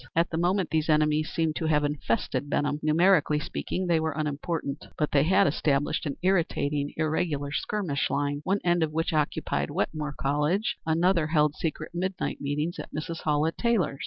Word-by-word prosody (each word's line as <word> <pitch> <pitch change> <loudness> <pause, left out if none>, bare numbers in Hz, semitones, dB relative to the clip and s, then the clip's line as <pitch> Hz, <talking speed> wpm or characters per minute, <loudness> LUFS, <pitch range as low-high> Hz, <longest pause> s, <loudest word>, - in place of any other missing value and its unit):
At 165 +1 +2
the 160 - -1
moment 180 +1 +1
these 160 0 0
enemies 155 0 +2
seemed 160 -2 -1
to 160 - -1
have 150 -1 +2
infested 145 -1 -1
Benham. 145 +1 0
Numerically 155 0 +3
speaking, 185 +4 -3
they 170 -2 +2
were 160 -1 -1
unimportant, 150 -1 -3
but 150 - 0
they 140 - +4
had 190 +6 +4
established 145 0 0
an 140 - -3
irritating, 150 -6 +1
irregular 155 -2 -1
skirmish 165 -3 -1
line, 145 +1 -1
one 195 +4 0
end 175 -1 +2
of 160 -1 +1
which 165 +1 -1
occupied 150 -1 0
Wetmore 150 -2 -2
College, 150 +9 +1
another 170 0 +2
held 150 -2 +2
secret 155 0 -4
midnight 185 +2 -3
meetings 150 +4 -2
at - - -7
Mrs. 160 +2 -5
Hallett 155 +1 +1
Taylor's. 200 - +1
155 Hz, 170 wpm, -27 LUFS, 145-170 Hz, -, they